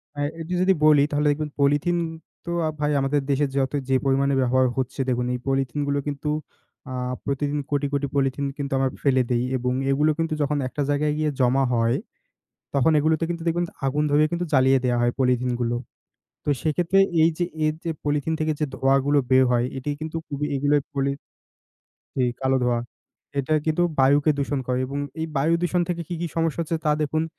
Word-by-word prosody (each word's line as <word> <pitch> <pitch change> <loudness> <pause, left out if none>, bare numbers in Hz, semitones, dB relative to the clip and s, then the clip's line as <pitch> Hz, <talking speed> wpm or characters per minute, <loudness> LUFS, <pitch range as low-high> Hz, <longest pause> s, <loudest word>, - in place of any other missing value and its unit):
অ্যা 145 - -4 0.2
এটা 165 +3 -5
যদি 190 +1 +4
বলি 150 -2 +6
তাহলে 150 0 +1
দেখবেন 150 +1 -2
পলিথিন 145 +5 +2 0.5
তো 170 - -4 0.3
ভাই 150 0 +1
আমাদের 140 +2 +1
দেশে 140 +1 +2
যত 135 -1 +1 0.2
যে 135 - +3
পরিমাণে 135 +1 +2
ব্যবহার 130 +1 +3
হচ্ছে 130 +1 -3
দেখুন, 125 -1 0
এই 125 - -2
পলিথিনগুলো 140 +2 0
কিন্তু 145 +1 -3 0.6
আ - - -4 0.3
প্রতিদিন 145 +1 -1
কোটি, 145 0 +1
কোটি 140 0 0
পলিথিন 135 0 0
কিন্তু 140 -1 -4
আমরা 135 0 +2
ফেলে 130 -2 +4
দেই 120 0 +2
এবং 125 0 -1 0.2
এগুলো 150 +3 +3
কিন্তু 165 -1 0
যখন 145 0 +1
একটা 145 - -4
জায়গায় 150 +1 +1
গিয়ে 155 0 +1
জমা 130 +1 +3
হয়, 115 +1 +2 0.8
তখন 140 +3 +3
এগুলোতে 155 +2 +2
কিন্তু 170 -1 -3
দেখবেন 170 +1 +1
ত - - -11 0.2
আগুন 145 +3 +1
ধরিয়ে 150 +1 +4
কিন্তু 175 +1 -1
জ্বালিয়ে 130 -1 +5
দেয়া 125 -1 +2
হয় 120 0 +2
পলিথিনগুলো। 125 -2 +1 0.7
তো - - -2
সেক্ষেত্রে 170 +5 +2 0.2
এই 165 - +6
যে, 175 - +1 0.2
এই 155 - +3
যে 165 - -1
পলিথিন 150 +2 0
থেকে 155 0 +1
যে 150 - +1
ধোঁয়াগুলো 135 +2 +2
বের 130 0 +6
হয় 120 0 +2
এটি 135 +2 -4
কিন্তু 160 +1 -4
খুবই, 145 0 -3
এগুলোর 145 +1 +2
পলি 140 0 0 1.0
জি, 130 - +1 0.2
কালো 135 0 +2
ধোঁয়া। 120 -1 +1 0.6
এটা 140 +3 0
কিন্তু 160 +2 +2 0.2
বায়ুকে 145 +3 +4
দূষণ 140 0 -1
করে 125 0 0
এবং 140 +2 -5 0.2
এই 160 - -1
বায়ু 155 +5 +2
দূষণ 175 0 +1
থেকে 170 -1 -1
কি, - - -4
কি 175 - -1
সমস্যা 165 -1 0
হচ্ছে 165 0 -1
তা 150 - +4
দেখুন। 155 +1 0
145 Hz, 190 wpm, -24 LUFS, 130-155 Hz, 1.0 s, বলি